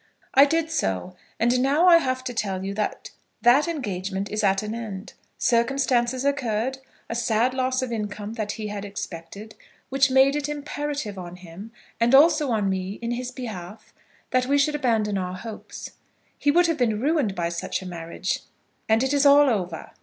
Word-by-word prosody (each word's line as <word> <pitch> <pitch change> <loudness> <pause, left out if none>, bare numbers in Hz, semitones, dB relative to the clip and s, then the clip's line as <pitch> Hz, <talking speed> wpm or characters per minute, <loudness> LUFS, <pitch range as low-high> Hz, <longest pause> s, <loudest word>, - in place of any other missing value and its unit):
"I 275 +2 +8
did 325 +2 0
so, 95 - -2 0.2
and 240 +2 +3
now 285 +6 +3
I 350 -2 +8
have 255 -5 -1
to 250 - -4
tell 195 -4 -2
you 195 - -3
that 210 +1 -3 0.3
that 255 +7 +5
engagement 200 - -3
is 215 +1 -1
at 195 0 +2
an 215 +1 -4
end. 215 -4 -6 0.2
Circumstances 250 +1 +1
occurred, 260 -2 -1 0.3
a - - -4
sad 235 +1 +1
loss 260 0 0
of 255 - -4
income 210 -1 -4
that 215 -3 -3
he 215 - -6
had 205 -1 -5
expected, 200 +1 -7 0.4
which 270 0 +3
made 265 +2 +5
it 295 0 -2
imperative 290 -7 -4
on 175 -1 -8
him, 180 +4 -11 0.3
and 235 +3 +4
also 300 0 +5
on 215 -4 +1
me 190 0 -2
in 235 - -2
his 245 +1 -3
behalf, 220 -5 -8 0.4
that 255 0 +2
we 285 +1 +3
should 285 +2 +2
abandon 225 -8 +1
our 180 0 -4
hopes. 220 +3 -8 0.4
He 290 - 0
would 350 +4 +5
have 330 -2 +1
been 220 -4 +1
ruined 275 -6 +1
by 170 -2 -1
such 170 +2 -3
a - - -7
marriage, 170 +2 -3 0.5
and 220 +3 +4
it 265 +2 0
is 285 -1 +3
all 285 -1 +7
over." 180 -6 -3
235 Hz, 185 wpm, -24 LUFS, 200-270 Hz, 0.5 s, I